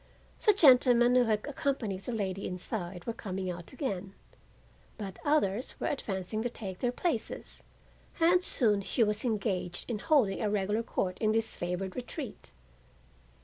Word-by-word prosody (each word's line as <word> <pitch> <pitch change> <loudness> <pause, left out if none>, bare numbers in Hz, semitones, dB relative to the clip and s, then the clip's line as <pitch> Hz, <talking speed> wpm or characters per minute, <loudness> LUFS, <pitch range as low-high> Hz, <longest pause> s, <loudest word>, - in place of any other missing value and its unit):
The 425 - +6
gentlemen 250 -7 +6
who 250 -1 +5
had 215 -2 0
accompanied 265 -9 -2
the - - -3
lady 200 -4 -2
inside 180 -1 -5
were 230 - -2
coming 190 -4 -4
out 175 -1 -7
again, 200 -8 -4 0.8
but 195 -3 -7
others 250 -7 +1
were - - -2
advancing 215 -5 -2
to 245 - -1
take 190 -6 -7
their 245 - +1
places, 275 -2 -3 0.6
and 350 +2 +4
soon 210 - +3
she 205 +4 +1
was 210 -1 0
engaged 200 -6 -1
in 230 -4 -2
holding 250 - +2
a 215 - +1
regular 205 +2 0
court 185 -5 -2
in 215 -1 +2
this 225 0 0
favored 180 +2 -3
retreat. 250 -2 -6
215 Hz, 150 wpm, -30 LUFS, 190-245 Hz, 0.8 s, The